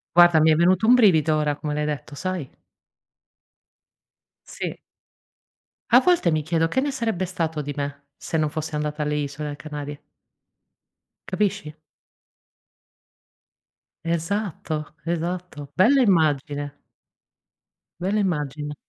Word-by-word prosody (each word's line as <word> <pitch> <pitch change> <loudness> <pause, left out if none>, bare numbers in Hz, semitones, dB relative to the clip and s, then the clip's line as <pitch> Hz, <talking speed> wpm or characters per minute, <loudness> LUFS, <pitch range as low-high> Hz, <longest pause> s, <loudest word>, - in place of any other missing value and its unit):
Guarda 175 -2 +7
mi 160 +1 +5
è - - +5
venuto 185 +6 +3
un 245 - +8
brivido, 165 -10 +5
ora, 150 -1 0
come 150 0 -4
l'hai 150 0 -1
detto, 150 -1 -4
sai? 185 -4 -4 2.0
Sì. - - -6 1.1
A 250 - +10
volte 340 - +3
mi 155 -1 +1
chiedo 165 +1 0
che 260 - +1
ne 285 +2 0
sarebbe 225 -8 -1
stato 165 -4 -2
di 145 0 -5
me, 140 0 -5
se 160 - -3
non 155 -1 +1
fosse 155 0 -4
andata 150 0 -3
alle 150 0 -1
Isole 145 0 -4
Canarie? 145 -1 -7 1.2
Capisci? 195 -5 -1 2.3
Esatto, 165 -3 -3
esatto 170 -3 -3
bella 265 +9 +5
immagine. 145 - +1 1.2
Bella 195 +4 0
immagine. 150 -5 -2
160 Hz, 115 wpm, -24 LUFS, 150-185 Hz, 2.3 s, A